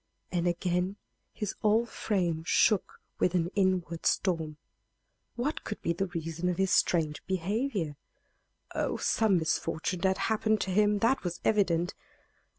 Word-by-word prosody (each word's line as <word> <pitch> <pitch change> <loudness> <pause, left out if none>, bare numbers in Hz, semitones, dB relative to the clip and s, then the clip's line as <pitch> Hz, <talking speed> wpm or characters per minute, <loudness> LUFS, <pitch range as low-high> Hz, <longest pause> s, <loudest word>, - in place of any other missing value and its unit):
and 175 -1 0
again 180 +2 0 0.4
his 210 -2 -3
whole 220 +2 +3
frame 175 -8 -1
shook 200 +4 +2 0.2
with 180 - +2
an 175 0 +1
inward 185 -4 0
storm. 160 -5 0 0.8
What 270 +6 -2
could 210 - -5
be 170 - +1
the 195 +3 -1
reason 165 0 -3
of 175 - -1
his 190 -1 +1
strange 155 -4 +2
behavior? 190 - -1 0.8
Oh, - - -1
some 215 -4 +2
misfortune 160 +2 -1
had 190 0 +2
happened 220 -1 +1
to 190 - -1
him 210 +2 +3
that 260 +4 +3
was 175 -1 -3
evident! 180 -5 +2
185 Hz, 140 wpm, -30 LUFS, 170-210 Hz, 0.8 s, whole